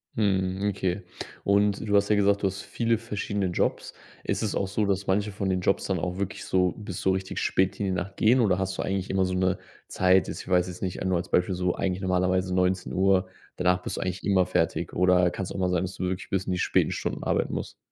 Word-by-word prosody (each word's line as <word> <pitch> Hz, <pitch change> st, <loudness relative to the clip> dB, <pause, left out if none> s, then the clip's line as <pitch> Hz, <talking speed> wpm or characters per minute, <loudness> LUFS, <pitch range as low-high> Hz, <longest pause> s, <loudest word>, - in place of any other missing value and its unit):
Mhm, 95 Hz, -1 st, +1 dB
okay, 95 Hz, 0 st, -2 dB, 0.4 s
und 100 Hz, +1 st, +2 dB
du 100 Hz, -, +2 dB
hast 100 Hz, +1 st, +3 dB
ja 105 Hz, -, +4 dB
gesagt: 100 Hz, 0 st, +3 dB
„Du 100 Hz, -, +2 dB
hast 95 Hz, +1 st, -5 dB
viele 115 Hz, -1 st, 0 dB
verschiedene 100 Hz, -3 st, -3 dB
Jobs.” 90 Hz, -, -1 dB, 0.3 s
Ist -, -, -1 dB
es 110 Hz, -, -1 dB
auch 95 Hz, -, 0 dB
so, 105 Hz, +2 st, 0 dB
dass 100 Hz, 0 st, 0 dB
manche 100 Hz, +2 st, +1 dB
von 95 Hz, 0 st, -2 dB
den 90 Hz, -1 st, 0 dB
Jobs 100 Hz, -, +1 dB
dann 95 Hz, -3 st, -1 dB
auch 90 Hz, +2 st, -3 dB
wirklich 100 Hz, -1 st, -4 dB
so 90 Hz, -1 st, +2 dB
bis 100 Hz, -4 st, -6 dB
so 95 Hz, -, +2 dB
richtig 95 Hz, 0 st, -2 dB
spät 95 Hz, +2 st, +1 dB
in 100 Hz, -, 0 dB
die 95 Hz, -, 0 dB
Nacht 95 Hz, +2 st, -4 dB
gehen, 120 Hz, +4 st, +4 dB
oder 95 Hz, -5 st, +3 dB
hast 95 Hz, 0 st, -2 dB
du -, -, -1 dB
eigentlich 95 Hz, 0 st, -2 dB
immer 95 Hz, -1 st, +2 dB
so 90 Hz, 0 st, -2 dB
'ne 95 Hz, 0 st, +1 dB, 0.3 s
Zeit 95 Hz, -2 st, +3 dB
jetzt -, -, -5 dB
ich -, -, -14 dB
weiß 90 Hz, -1 st, +3 dB
jetzt 90 Hz, -1 st, -8 dB
nicht, 95 Hz, -1 st, -3 dB
nur 95 Hz, -2 st, +2 dB
als 85 Hz, -, -4 dB
Beispiel, 90 Hz, +1 st, +2 dB
so 90 Hz, 0 st, 0 dB
eigentlich 95 Hz, 0 st, -2 dB
normalerweise 90 Hz, 0 st, +1 dB
19:00, 95 Hz, +1 st, +2 dB, 0.3 s
danach 90 Hz, 0 st, +1 dB
bist -, -, -4 dB
du -, -, -3 dB
eigentlich 95 Hz, 0 st, -3 dB
immer 95 Hz, -3 st, +3 dB
fertig 85 Hz, -2 st, 0 dB
oder 90 Hz, -1 st, +4 dB
kann's 95 Hz, +1 st, -5 dB
auch -, -, -5 dB
mal 90 Hz, -, +1 dB
sein, 90 Hz, 0 st, +1 dB
dass 95 Hz, -, -5 dB
du -, -, -5 dB
wirklich 90 Hz, 0 st, -3 dB
bis 95 Hz, -1 st, -1 dB
in 95 Hz, -, -1 dB
die -, -, -1 dB
späten -, -, +2 dB
Stunden -, -, -3 dB
arbeiten -, -, 0 dB
musst? -, -, -5 dB
95 Hz, 250 wpm, -26 LUFS, 90-100 Hz, 0.4 s, ja